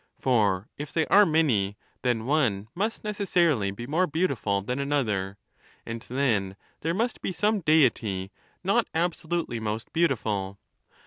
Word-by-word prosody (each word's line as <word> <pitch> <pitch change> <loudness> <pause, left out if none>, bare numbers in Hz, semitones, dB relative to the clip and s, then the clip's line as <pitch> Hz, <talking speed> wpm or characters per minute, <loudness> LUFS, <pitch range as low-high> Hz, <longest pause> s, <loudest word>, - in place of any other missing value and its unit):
For 105 -6 +1
if 150 0 -5
they 160 -1 +1
are 205 0 +7
many, 120 -12 +2 0.2
then 120 -3 0
one 120 -8 +1
must 215 +5 -2
necessarily 175 - +1
be 100 +5 -6
more 165 +8 +1
beautiful 135 - 0
than 125 +6 -3
another, 110 -9 -1 0.5
and 115 0 -5
then 115 -8 0 0.2
there 165 +2 -1
must 230 +3 -1
be - - -2
some 210 +4 +1
Deity 115 - +2 0.3
not 210 +5 +2
absolute 170 0 -1
ly 120 - -4
most 110 0 -4
beautiful. 105 - 0
135 Hz, 140 wpm, -27 LUFS, 105-170 Hz, 0.5 s, are